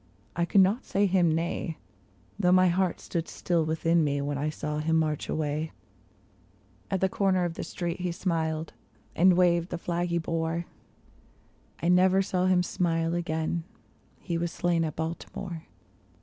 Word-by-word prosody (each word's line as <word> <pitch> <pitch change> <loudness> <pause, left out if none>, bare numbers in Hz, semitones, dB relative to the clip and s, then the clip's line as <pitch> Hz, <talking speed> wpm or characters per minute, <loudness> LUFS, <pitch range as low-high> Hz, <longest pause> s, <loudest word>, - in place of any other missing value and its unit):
I 170 - +1
could 195 +3 +5
not 200 +7 +2
say 200 +1 +1
him 180 -3 +3
nay, 165 0 -2 0.6
Though 180 -3 +3
my 185 0 +6
heart 180 0 0
stood 170 -2 -3
still 170 -2 0
within 160 +1 +2
me 145 -1 0
when 145 +1 -2
I 145 +2 -1
saw 150 0 -3
him 160 +1 +1
march 155 -2 0
away; 155 +1 -2 1.2
At 190 -2 -1
the 190 - +4
corner 190 -2 +1
of 170 - -2
the - - -5
street 175 0 -4
he 180 -1 -1
smiled, 160 -3 -2 0.4
and 180 +1 +5
waved 175 -1 +3
the - - -3
flag 175 +1 -2
he 170 0 0
bore; 165 0 -2 1.2
I 170 - +2
never 185 +2 +5
saw 185 -1 0
him 180 -1 +3
smile 165 -2 0
again 165 -1 -1 0.3
— - - -35
he 170 -2 0
was 170 0 -2
slain 175 -2 +1
at 155 - -4
Baltimore. 165 +1 -5
170 Hz, 165 wpm, -28 LUFS, 160-180 Hz, 1.2 s, my